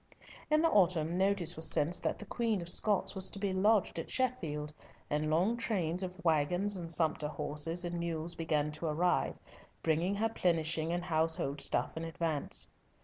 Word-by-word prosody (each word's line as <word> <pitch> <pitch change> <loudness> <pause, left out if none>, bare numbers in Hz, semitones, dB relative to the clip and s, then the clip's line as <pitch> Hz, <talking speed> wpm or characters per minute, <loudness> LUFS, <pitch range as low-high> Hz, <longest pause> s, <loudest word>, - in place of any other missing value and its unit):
In 305 +1 +3
the 330 - +5
autumn, 175 -4 +3
notice 190 -2 +2
was 160 0 0
sent 165 +4 +1
that - - -1
the 210 - -8
Queen 225 -1 -1
of 170 -1 -5
Scots 205 +2 +2
was 190 -1 +2
to - - -6
be 195 -1 -1
lodged 200 -2 +2
at - - -6
Sheffield, 160 - -1 0.4
and 150 +1 0
long 185 +9 +2
trains 180 -7 -1
of 185 0 -5
waggons 175 +6 +2
and 170 -3 -5
sumpter 160 -2 +2
horses 150 +3 -1
and 175 0 -3
mules 170 0 -3
began 150 -3 -1
to 155 +2 -4
arrive, 175 +4 +1 0.5
bringing 165 +5 +1
her 220 +3 +1
plenishing 165 -5 +1
and 175 0 -1
household 160 -4 0
stuff - - +1
in 160 - -4
advance. 165 -2 -2
170 Hz, 175 wpm, -33 LUFS, 155-190 Hz, 0.5 s, the